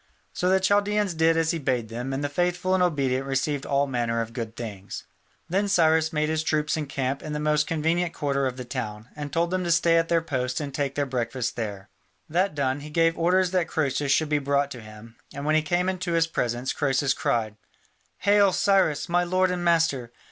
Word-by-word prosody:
So 180 - 0
the 190 0 +4
Chaldaeans 205 0 +2
did 165 0 +3
as 165 0 +2
he 165 - -2
bade 125 -5 -1
them, 120 +3 -4
and 135 +2 -2
the - - +1
faithful 180 +4 0
and 190 - +2
obedient 135 -7 +1
received 135 +1 -1
all 140 0 +2
manner 120 -3 -1
of 115 0 -4
good 115 -2 -5
things. 105 -5 -7 0.4
Then 195 +4 0
Cyrus 160 -4 +3
made 155 -1 0
his 160 0 0
troops 155 -1 0
encamp 140 -3 -2
in 155 - -6
the 150 - -2
most 150 0 +1
convenient 165 +2 0
quarter 140 -4 -1
of 130 -1 -5
the 125 - -6
town, 110 -3 -5
and 145 -1 -6
told 170 +3 0
them 185 0 0
to 175 - -2
stay 170 0 +4
at 165 - 0
their 170 0 +3
posts 130 -5 -2
and 145 -3 -5
take 140 -1 -2
their 145 - 0
breakfast 125 -1 -2
there. 105 -4 -5 0.4
That 180 +2 0
done, 135 -1 0
he 150 +1 -9
gave 165 +1 +2
orders 180 +1 +2
that 180 -3 +1
Croesus 140 -3 0
should 155 +1 +2
be 150 -1 +2
brought 140 0 0
to 125 - -7
him, 110 +1 -13 0.2
and 140 - -5
when 155 - +2
he 155 - +4
came 175 +4 0
into 185 -2 -2
his 165 -1 +3
presence, 125 -5 -2
Croesus 135 -1 +1
cried: 110 -3 -1 0.7
"Hail, 200 -1 +4
Cyrus, 190 -8 +2
my 175 0 +2
lord 185 +1 +1
and 180 -1 -2
master! 165 -8 +1
150 Hz, 215 wpm, -25 LUFS, 130-170 Hz, 0.7 s, the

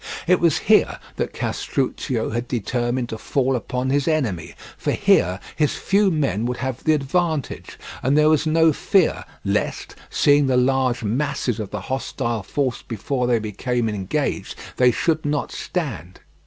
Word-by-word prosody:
It 180 +1 +4
was 170 -3 +3
here - - +4 0.2
that - - -1
Castruccio 125 -3 -2
had 120 +2 -2
determined 120 +1 -1
to 110 - -5
fall 135 +1 0
upon 125 +2 -2
his 140 -1 +1
enemy, 130 - -1 0.2
for - - -1
here 90 +2 +3 0.2
his 150 -2 +1
few 200 0 +2
men 135 - 0
would 125 - -2
have 130 -1 -4
the 155 - +4
advantage, 155 +1 -1 0.2
and 135 +3 +2
there 150 0 +5
was 155 0 +3
no 160 0 +4
fear 190 +3 +2 0.2
lest, - - -1 0.2
seeing 145 -1 +4
the 130 -1 +2
large 130 -1 +2
masses 125 +1 -1
of 105 -3 -4
the 105 - -5
hostile 120 -1 -2
force 130 +5 -2
before 125 +3 -2
they 120 -1 +3
became 115 +3 -2
engaged, 100 -4 -2 0.2
they 125 -1 +5
should 160 +6 0
not 145 0 -1
stand. 115 - -4
130 Hz, 155 wpm, -22 LUFS, 120-150 Hz, 0.2 s, there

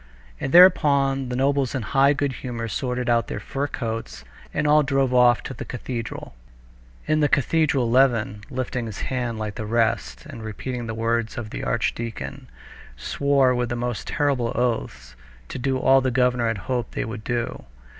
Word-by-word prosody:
And 135 - -3
thereupon 140 -7 +5
the 125 - -3
nobles 135 0 +1
in 130 - -2
high 140 +4 +3
good 140 -1 -1
humor 120 -3 -4
sorted 125 +1 -2
out 120 -1 +2
their - - -4
fur 140 +1 -3
coats 115 -4 -5 0.3
and - - -1
all 150 +1 +5
drove 135 -2 +1
off 125 -2 +5
to - - -6
the 115 - -7
cathedral. 120 - -6 0.7
In 155 0 +1
the 150 -1 +3
cathedral 140 -3 +2
Levin, 115 -5 +2
lifting 125 -2 -3
his 105 -3 -7
hand 120 -3 -2
like 110 -1 -4
the 110 0 -5
rest 110 - 0
and 115 - -9
repeating 120 +3 -5
the 115 - -4
words 115 0 -1
of 110 -3 -5
the - - -5
archdeacon, 115 - -3 0.5
swore 135 - +2
with 120 -1 -1
most 120 -1 -3
terrible 135 -5 0
oaths 115 - -2 0.3
to - - -5
do 130 +1 0
all 135 +1 +4
the 130 - 0
governor 125 -1 +2
had 115 -1 -1
hoped 125 -3 -2
they - - -2
would 110 -1 -7
do. 120 - -3
125 Hz, 175 wpm, -23 LUFS, 115-135 Hz, 0.7 s, thereupon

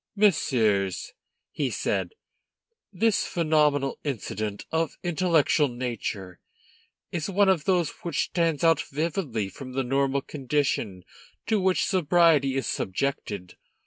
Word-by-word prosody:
"Messieurs," 125 - +2 0.4
he - - -1
said, - - -2 0.8
"this 210 +2 +2
phenomenal 150 -4 +1
incident 110 -6 -4
of 160 -2 -1
intellectual 165 -3 +2
nature 115 -7 -5 0.7
is 170 +2 -3
one 200 +1 +3
of 170 -6 +2
those 180 -4 +2
which 170 -4 0
stand 165 -2 0
out 165 0 +4
vividly 145 - -2
from 130 +5 -9
the 135 +1 0
normal 135 +1 0
condition 130 -9 -2 0.4
to 220 -1 +1
which 185 0 +2
sobriety 165 -6 +3
is 135 - -1
subjected. 100 -4 -3
145 Hz, 115 wpm, -26 LUFS, 125-170 Hz, 0.8 s, out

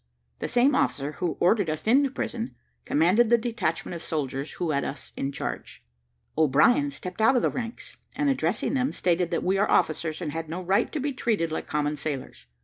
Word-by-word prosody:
The - - -2
same 250 +4 +3
officer 140 +4 0
who 175 -4 -1
ordered 185 0 +3
us 155 0 -3
into 270 +5 +4
prison, 240 -3 -4 0.3
commanded 185 +10 +3
the 235 - +6
detachment 225 -9 -2
of 170 - -6
soldiers 140 -3 -3
who 170 -3 -2
had 140 -1 0
us 135 - -6
in 135 - -2
charge. - - -6 0.5
O'Brien 160 - +4
stepped 185 -7 -6
out 225 +5 +5
of 245 - +2
the - - +2
ranks, 235 -1 -6 0.2
and 290 - 0
addressing 275 0 0
them, 265 0 0
stated 175 -1 +1
that 170 - -1
we 190 +1 +1
are 205 - +2
officers, 155 0 +1
and 165 -5 -3
had 160 0 -5
no 175 +3 -4
right 195 +6 +1
to 310 - -2
be 285 +1 -1
treated 210 -10 0
like 160 - -4
common 150 0 -1
sailors. 140 - -5
180 Hz, 200 wpm, -26 LUFS, 155-240 Hz, 0.5 s, the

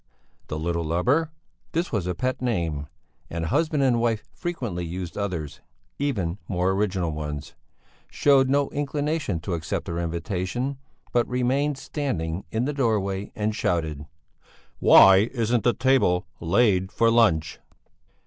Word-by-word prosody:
The 75 - -4
little 85 +1 -1
lubber 125 - +1 0.4
this 170 +2 -1
was 100 -6 -1
a 90 - -1
pet 130 +7 -2
name, 85 - -1 0.4
and 85 0 -3
husband 155 - +1
and 120 -3 +3
wife 115 -2 0
frequently 120 - -4
used 85 +1 -5
others, 90 -8 -4 0.4
even 100 -11 -1
more 90 0 +1
original 95 -4 0
ones 75 -1 -5 0.6
showed 135 -2 +4
no 140 0 +2
inclination 145 - -1
to 90 +2 -3
accept 85 +2 -3
her 85 -1 -3
invitation, 95 +10 -3 0.3
but 120 -1 +2
remained 130 +3 0
standing 100 - -3
in 115 +3 -1
the 145 - -1
doorway 105 -7 -1
and 105 0 -1
shouted: 80 -7 -1 0.7
"Why 95 +4 +7
isn't 120 -2 +1
the 120 - +3
table 130 -7 +2
laid 95 +1 +2
for 115 0 +3
lunch?" 85 -9 +2
105 Hz, 135 wpm, -25 LUFS, 85-130 Hz, 0.7 s, Why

